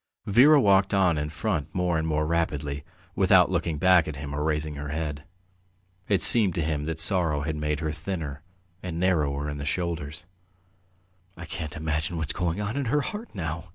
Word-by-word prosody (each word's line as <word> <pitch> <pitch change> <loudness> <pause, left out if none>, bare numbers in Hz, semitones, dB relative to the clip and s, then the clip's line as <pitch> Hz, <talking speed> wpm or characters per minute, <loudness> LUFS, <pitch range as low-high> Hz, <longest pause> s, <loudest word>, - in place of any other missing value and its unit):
Vera 135 +9 +6
walked 100 -4 +3
on 90 -4 +3
in 75 0 -3
front 80 -2 -3
more 90 -2 0
and 80 - -2
more 75 -1 0
rapidly, 75 -3 -2 0.3
without - - +4
looking 80 -3 -1
back 90 +1 +4
at 80 - -5
him 70 0 -7
or 75 +1 -2
raising 75 0 -1
her 75 0 -6
head. 75 -1 -4 0.8
It 100 -4 +1
seemed 105 -6 +7
to 85 - -1
him 75 -1 -2
that 80 0 -4
sorrow 80 -3 +1
had 80 +1 -3
made 75 0 -2
her 80 -2 -2
thinner 80 -3 -5 0.4
and 85 -2 -5
narrower 75 -6 0
in 75 0 -5
the - - -5
shoulders. 80 -1 -4 1.1
"I 85 - -8
can 80 -1 -5
imagine 80 +2 -3
what's 80 -3 -2
going 90 +1 -2
on 105 +3 -3
in 140 - -1
her 145 +5 +1
heart 210 - -7
now!" 80 -1 -4
80 Hz, 190 wpm, -26 LUFS, 75-90 Hz, 1.1 s, seemed